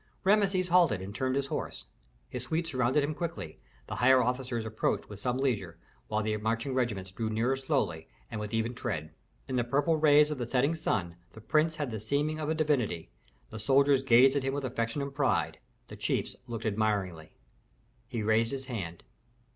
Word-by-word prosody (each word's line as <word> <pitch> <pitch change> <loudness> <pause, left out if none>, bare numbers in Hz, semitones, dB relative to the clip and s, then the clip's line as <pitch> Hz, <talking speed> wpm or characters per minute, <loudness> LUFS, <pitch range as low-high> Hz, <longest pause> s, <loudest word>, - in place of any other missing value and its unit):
Rameses 195 -2 +3
halted 170 - +4
and 95 +2 -7
turned 130 +3 -1
his 140 0 0
horse. - - -4 0.4
His 125 -1 -6
suite 160 +6 -1
surrounded 130 -1 +1
him 150 +2 -1
quickly, 165 - -5 0.3
the - - -6
higher 130 +2 +6
officers 125 -1 -2
approached 110 0 -1
with 105 -1 -9
some 125 +3 -1
leisure, 105 -11 -1 0.3
while 110 0 0
the 110 0 0
marching 115 +5 -1
regiments 105 -7 -1
drew 110 +3 -3
nearer 115 +4 +1
slowly 130 - -1 0.2
and - - -4
with 105 -1 -5
even 115 +1 0
tread. 80 - -4 0.3
In 130 - -1
the 120 - +2
purple 145 +7 +2
rays 150 0 +5
of 150 - -3
the 120 - -2
setting 135 +5 +2
sun, 90 - -2 0.2
the - - -11
prince 155 +8 +2
had 145 -5 -3
the 110 - -4
seeming 145 +8 -1
of 155 -1 -2
a 160 - +1
divinity, 130 - 0 0.4
the 110 - -6
soldiers 135 +4 +4
gazed 130 +1 +6
at 140 - +2
him 135 +1 -1
with 140 -1 -2
affection 120 +2 -2
and 140 0 -5
pride, 140 -2 0 0.3
the - - -9
chiefs - - -2
looked 115 -1 -5
admiringly. 100 -7 -1 0.7
He 115 -4 -3
raised 110 +2 +3
his 135 0 -4
hand. 95 -10 -5
125 Hz, 190 wpm, -30 LUFS, 110-140 Hz, 0.7 s, higher